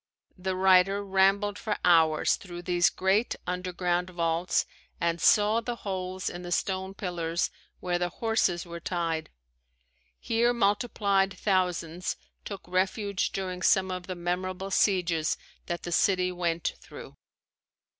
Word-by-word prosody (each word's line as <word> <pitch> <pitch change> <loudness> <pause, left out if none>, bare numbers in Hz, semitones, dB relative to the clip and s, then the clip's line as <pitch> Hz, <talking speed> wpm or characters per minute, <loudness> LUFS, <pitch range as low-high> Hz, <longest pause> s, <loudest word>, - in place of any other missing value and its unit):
The 185 0 -3
writer 190 +2 +4
rambled 195 +1 +2
for 210 -2 -2
hours 160 -3 +4
through 175 -2 -9
these 175 +2 +3
great 195 +4 +1
underground 180 0 -1
vaults 170 0 0 0.3
and 170 -1 0
saw 215 +2 +4
the 240 +1 -3
holes 185 -3 -4
in 175 - -4
the 175 0 -7
stone 190 +2 -1
pillars 170 -3 -2 0.3
where 175 -1 -1
the 175 0 0
horses 190 -4 0
were 170 0 -7
tied. 165 -2 -2 0.9
Here 235 +1 +2
multiplied 200 -3 +1
thousands 180 -3 0 0.3
took 200 -3 -7
refuge 190 +2 0
during 185 -2 -4
some 190 0 +3
of 180 -1 -5
the 185 - -4
memorable 185 +2 -3
sieges 175 -5 +2 0.3
that 175 0 -3
the 175 - -5
city 185 -1 +2
went 170 -2 -1
through. - - -11
185 Hz, 130 wpm, -28 LUFS, 175-195 Hz, 0.9 s, writer